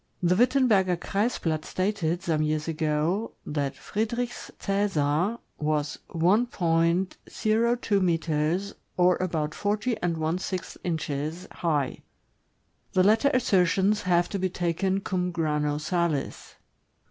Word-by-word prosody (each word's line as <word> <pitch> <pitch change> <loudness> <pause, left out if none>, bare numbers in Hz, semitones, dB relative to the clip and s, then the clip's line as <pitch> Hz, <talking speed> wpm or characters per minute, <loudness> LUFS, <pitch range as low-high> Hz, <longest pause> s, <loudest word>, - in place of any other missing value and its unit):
The 175 +1 +4
Witten 255 +6 +4
berger 190 -5 +3
Kreisblatt 180 -6 -1
stated, 185 -3 -1
some 160 -2 +1
years 155 0 0
ago, 160 +6 0
that 145 -2 -2
Friedrich's 235 +3 -3
Csesar 195 -1 +1 0.2
was 150 -2 -1
1.02 195 +4 +1
meters, 165 +2 0 0.2
or 180 0 +5
about 160 -4 -1
forty 210 +4 -1
and 170 -2 0
one 160 +3 -1
sixth 185 -1 -4
inches, 160 0 -3
high. 150 -6 -1 0.9
The 185 - +4
latter 220 +8 +4
assertions 200 - +2
have 175 -1 +2
to 200 - -3
be 185 0 0
taken 180 +3 0
cum 180 -2 -1
grano 150 -3 0
sails. 160 -2 -2
180 Hz, 110 wpm, -27 LUFS, 155-200 Hz, 0.9 s, or